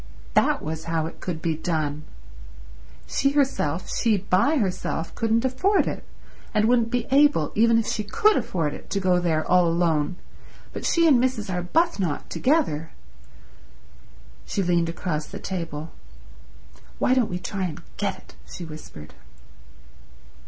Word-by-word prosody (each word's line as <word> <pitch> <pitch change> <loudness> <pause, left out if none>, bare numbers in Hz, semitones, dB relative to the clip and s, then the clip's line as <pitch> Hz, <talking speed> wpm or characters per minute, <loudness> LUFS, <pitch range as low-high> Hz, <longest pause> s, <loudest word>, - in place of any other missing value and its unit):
That - - +2
was 160 +1 -4
how 165 -1 -1
it 165 - -8
could 165 -3 -5
be 165 - +1
done. 155 -2 -2 1.0
She 275 0 0
herself, 225 - 0
she 225 -3 +3
by 200 - +2
herself, 185 - -2
couldn't 230 +2 +1
afford 370 +11 +2
it, - - -4 0.5
and 215 0 +4
wouldn't 235 -1 +3
be 245 -1 -1
able, 280 - +4
even 230 +1 +4
if 230 - +1
she 215 - -2
could 425 - +3
afford 175 - -1
it, - - -11
to 200 - -1
go 185 -2 +3
there 160 -3 0
all 180 -1 +4
alone; 165 -1 +1 0.6
but - - -3
she 335 -1 +4
and 260 -5 +5
Mrs. 220 -7 -1
Arbuthnot 180 - 0
together... 250 - +1 1.5
She 195 - -2
leaned 170 -1 +2
across 165 -2 -3
the - - -7
table, 165 -4 -5 1.1
"Why 255 - +2
don't 255 -4 +2
we 180 - -2
try 190 +1 -3
and 170 -1 -6
get 195 -2 -1
it?" - - -18 0.2
she 175 - -7
whispered. 150 - -10
185 Hz, 145 wpm, -24 LUFS, 165-235 Hz, 1.5 s, and